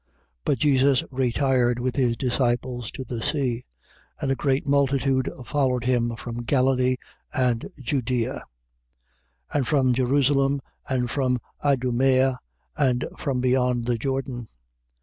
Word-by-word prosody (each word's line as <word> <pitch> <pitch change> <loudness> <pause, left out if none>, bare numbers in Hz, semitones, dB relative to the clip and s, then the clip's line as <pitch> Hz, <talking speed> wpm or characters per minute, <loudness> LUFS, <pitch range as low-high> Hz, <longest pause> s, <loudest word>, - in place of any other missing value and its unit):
3:7. - - -47 0.4
But 135 - +2
Jesus 135 0 +3
retired 125 -1 +1
with 125 +1 -2
his 120 -4 +1
disciples 125 -2 -1
to 130 - -5
the 120 -2 -5
sea; 125 -4 -1 0.5
and 135 - -1
a - - +2
great 135 0 0
multitude 135 -2 +2 0.2
followed 130 -1 +1
him 120 -2 +1
from 120 +1 -6
Galilee 130 0 +2 0.4
and 125 -3 0
Judea, 125 -3 -1 1.1
3:8. - - 0
And 135 -4 0
from 130 -2 +3
Jerusalem, 135 +2 +2 0.3
and 125 -2 0
from 130 -3 +1 0.3
Idumea 130 -1 +2 0.4
and 130 -4 +1
from 130 -3 -1
beyond 125 -1 +2
the 120 -1 0
Jordan. 130 -2 -3
130 Hz, 130 wpm, -25 LUFS, 120-135 Hz, 1.1 s, Jesus